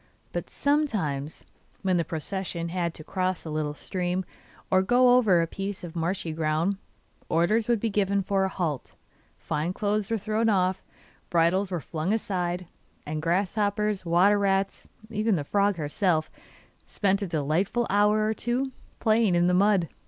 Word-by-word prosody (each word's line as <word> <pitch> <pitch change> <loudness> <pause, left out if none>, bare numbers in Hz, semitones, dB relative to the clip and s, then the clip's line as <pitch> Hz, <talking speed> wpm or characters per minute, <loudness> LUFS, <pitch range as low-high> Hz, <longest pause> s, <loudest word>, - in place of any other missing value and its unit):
But - - -4
sometimes, 205 - -1 0.4
when 185 -2 +2
the 170 - +2
procession 170 +2 -4
had 170 -1 -2
to 155 - -8
cross 185 +1 -2
a 160 - -5
little 150 -1 -2
stream, 180 +2 -2 0.5
or 185 0 +5
go 245 +5 +5
over 195 -9 +4
a - - +1
piece 195 +3 -5
of 175 -1 -8
marshy 170 0 -2
ground, 160 +5 0 0.5
orders 210 +8 +2
would 235 -2 +2
be 225 +1 -1
given 200 -1 +1
for 195 0 +1
a 190 - +1
halt; 160 -9 -3 0.4
fine 150 - -2
clothes 205 0 -1
were 225 - +1
thrown 215 +2 0
off, 190 -2 +1 0.5
bridles 175 +3 +2
were 180 -2 -2
flung 160 +6 -2
aside, 180 -4 -2 0.4
and 155 +1 -3
grasshoppers, 205 +4 0
water 185 +4 +4
rats, 195 0 0 0.2
even 215 0 +1
the 150 - -1
frog 200 +5 +2
herself, 155 +1 0 0.6
spent 200 0 +1
a 200 - -2
delightful 170 - 0
hour 210 +2 +3
or 215 - +1
two 250 +4 -1 0.3
playing 220 -4 +3
in 175 0 +3
the 180 - +3
mud. 195 -2 +3
190 Hz, 160 wpm, -27 LUFS, 170-205 Hz, 0.6 s, or